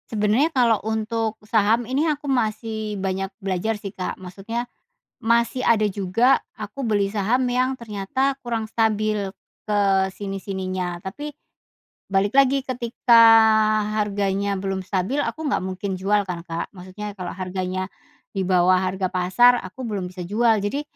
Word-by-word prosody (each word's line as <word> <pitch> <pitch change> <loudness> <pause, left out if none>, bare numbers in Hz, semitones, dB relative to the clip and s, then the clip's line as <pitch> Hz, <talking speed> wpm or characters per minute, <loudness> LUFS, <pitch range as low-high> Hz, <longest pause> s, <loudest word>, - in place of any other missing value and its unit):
Sebenarnya 220 +7 +2
kalau 240 -6 +3
untuk 220 +1 -2
saham 220 +2 +2
ini 275 +7 0
aku 295 0 -3
masih 220 -4 -1
banyak 190 0 -2
belajar 195 +1 -1
sih, 200 -2 -8
Kak, 185 - -4
maksudnya, 195 +6 -5 0.6
masih 235 +2 +2
ada 215 -2 +4
juga 200 +6 +2 0.2
aku 215 +6 -6
beli 205 -3 +1
saham 215 +5 +1
yang 255 +2 +1
ternyata 255 +4 -2
kurang 225 -2 -2
stabil 215 -3 0 0.3
ke 210 -1 +1 0.3
sini-sininya 190 -3 -4
tapi, 290 +10 -6 0.8
balik 195 +1 +1
lagi 275 0 +5
ketika 235 -2 +3 0.8
harganya 200 -1 0
belum 195 -1 -2
stabil, 195 +10 -1
aku 315 +2 -4
nggak 280 - 0
mungkin 190 +1 -4
jual 200 +2 +1
kan, 180 -2 -5
Kak, 170 +2 -5
maksudnya 195 +3 -8
kalau 180 -2 -5
harganya 185 0 -3 0.5
di 195 - -1
bawah 185 0 +4
harga 185 0 -1
pasar 185 +7 +5
aku 185 +8 -9
belum 205 -5 -3
bisa 180 0 -8
jual. 220 +4 +3
Jadi 205 +8 -2
210 Hz, 140 wpm, -23 LUFS, 190-235 Hz, 0.8 s, lagi